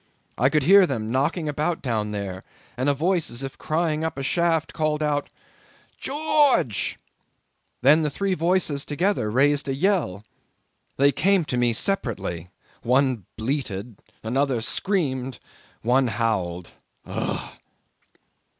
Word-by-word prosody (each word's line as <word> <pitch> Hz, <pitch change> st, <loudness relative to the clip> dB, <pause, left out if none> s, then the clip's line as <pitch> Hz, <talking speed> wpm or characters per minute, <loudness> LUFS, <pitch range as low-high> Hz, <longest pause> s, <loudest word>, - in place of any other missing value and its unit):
I 130 Hz, +3 st, +3 dB
could 150 Hz, 0 st, +2 dB
hear 195 Hz, +4 st, +7 dB
them 115 Hz, -6 st, -3 dB
knocking 145 Hz, +5 st, 0 dB
about 150 Hz, +3 st, -1 dB
down 110 Hz, -5 st, -1 dB
there, 100 Hz, -3 st, -5 dB, 0.3 s
and 130 Hz, +3 st, 0 dB
a -, -, +3 dB
voice 170 Hz, +3 st, 0 dB
as 120 Hz, +3 st, -5 dB
if 135 Hz, -1 st, -7 dB
crying 155 Hz, -1 st, -1 dB
up 160 Hz, -3 st, -3 dB
a 135 Hz, -, -3 dB
shaft 165 Hz, +1 st, +1 dB
called 155 Hz, -1 st, 0 dB
out 145 Hz, -1 st, -1 dB, 0.7 s
'George!' 290 Hz, -, +2 dB, 0.9 s
Then 150 Hz, +3 st, +5 dB
three 195 Hz, +6 st, -1 dB
voices 165 Hz, -4 st, +1 dB
together 150 Hz, -, 0 dB
raised 140 Hz, +5 st, +2 dB
a 135 Hz, -, 0 dB
yell. 150 Hz, -, 0 dB, 0.7 s
They 140 Hz, +1 st, +5 dB
came 185 Hz, +3 st, +2 dB
to 130 Hz, -, -2 dB
me 120 Hz, -1 st, +2 dB
separately: 100 Hz, -, -2 dB, 0.3 s
one 125 Hz, -5 st, +1 dB
bleated, 115 Hz, -3 st, -4 dB, 0.2 s
another 130 Hz, +2 st, 0 dB
screamed, 130 Hz, -, -1 dB, 0.5 s
one 125 Hz, +3 st, +3 dB
howled. 100 Hz, -7 st, -1 dB, 0.4 s
Ough!" -, -, -4 dB
140 Hz, 125 wpm, -24 LUFS, 120-165 Hz, 0.9 s, hear